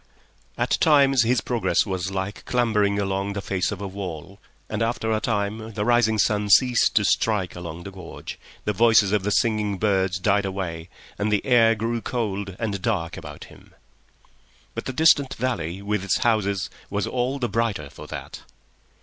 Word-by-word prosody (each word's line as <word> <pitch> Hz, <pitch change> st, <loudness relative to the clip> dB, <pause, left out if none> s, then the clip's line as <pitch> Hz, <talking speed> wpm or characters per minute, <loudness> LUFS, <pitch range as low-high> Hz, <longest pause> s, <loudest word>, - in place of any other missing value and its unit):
At -, -, 0 dB
times 140 Hz, -4 st, +5 dB
his 120 Hz, 0 st, +2 dB
progress 120 Hz, -2 st, +1 dB
was 95 Hz, -2 st, -3 dB
like 95 Hz, +1 st, -4 dB
clambering 105 Hz, -5 st, +1 dB
along 100 Hz, 0 st, -1 dB
the 100 Hz, -, -3 dB
face 95 Hz, 0 st, -1 dB
of 100 Hz, -1 st, -6 dB
a 100 Hz, -, -3 dB
wall, 95 Hz, -1 st, -7 dB, 0.3 s
and 110 Hz, 0 st, -3 dB
after 115 Hz, -1 st, -1 dB
a 110 Hz, -, +1 dB
time 110 Hz, 0 st, -2 dB
the 105 Hz, -1 st, -1 dB
rising 120 Hz, -2 st, +3 dB
sun 105 Hz, -1 st, +1 dB
ceased 125 Hz, +3 st, +4 dB
to 105 Hz, -, +4 dB
strike 105 Hz, -4 st, +1 dB
along 85 Hz, -1 st, -7 dB
the 100 Hz, -, -8 dB
gorge, 95 Hz, -3 st, -9 dB, 0.3 s
the 105 Hz, -, 0 dB
voices 110 Hz, -1 st, +4 dB
of 105 Hz, -2 st, +2 dB
the 100 Hz, -, -2 dB
singing 105 Hz, -2 st, +1 dB
birds 95 Hz, -2 st, +1 dB
died 100 Hz, +2 st, +2 dB
away, 90 Hz, -4 st, -4 dB, 0.3 s
and 105 Hz, +1 st, 0 dB
the 105 Hz, -, +1 dB
air 115 Hz, -3 st, +5 dB
grew 115 Hz, +2 st, -2 dB
cold 100 Hz, -5 st, -3 dB
and 100 Hz, -4 st, -3 dB
dark 95 Hz, -8 st, -1 dB
about -, -, -9 dB
him. -, -, -17 dB, 1.0 s
But -, -, -5 dB
the -, -, -2 dB
distant 145 Hz, -2 st, +4 dB
valley 100 Hz, -7 st, -3 dB
with 105 Hz, -1 st, -1 dB
its 100 Hz, -, +1 dB
houses 100 Hz, -4 st, 0 dB, 0.2 s
was 100 Hz, 0 st, -1 dB
all 130 Hz, +2 st, -1 dB
the 125 Hz, -3 st, -1 dB
brighter 100 Hz, -9 st, -2 dB
for -, -, -11 dB
that. -, -, -8 dB
105 Hz, 175 wpm, -24 LUFS, 95-115 Hz, 1.0 s, times